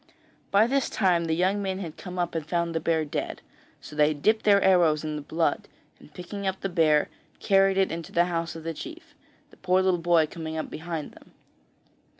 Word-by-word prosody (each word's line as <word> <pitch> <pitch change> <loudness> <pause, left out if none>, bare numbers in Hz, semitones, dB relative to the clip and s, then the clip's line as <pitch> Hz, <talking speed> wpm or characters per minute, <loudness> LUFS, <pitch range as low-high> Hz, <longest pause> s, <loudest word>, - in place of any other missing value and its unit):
By 200 +2 +5
this 270 +2 0
time 180 -4 +1
the 160 -1 0
young 190 +4 +1
men 190 -1 -2
had 170 -5 -6
come 180 -1 -8
up 175 -1 -1
and 165 -2 -2
found 170 +1 -1
the 165 - 0
bear 160 -1 0
dead, 145 - -4 0.4
so 150 - -11
they 150 0 +3
dipped 215 +10 +1
their 200 -1 +6
arrows 175 -6 +3
in 155 -1 -3
the 150 - -4
blood, 160 +3 -1 0.3
and - - -17
picking 195 +4 -6
up 190 0 -3
the 195 - -2
bear, 155 -4 +3 0.3
carried 195 -1 +3
it 195 -1 +2
into 165 -1 -6
the 175 +1 +3
house 170 -1 -3
of 165 - -8
the 165 0 -3
chief, 330 - -10 0.4
the - - -19
poor 185 0 +2
little 185 -2 +2
boy 170 -1 +3
coming 160 0 -6
behind 160 -1 -6
them. - - -19
175 Hz, 205 wpm, -26 LUFS, 160-190 Hz, 0.4 s, their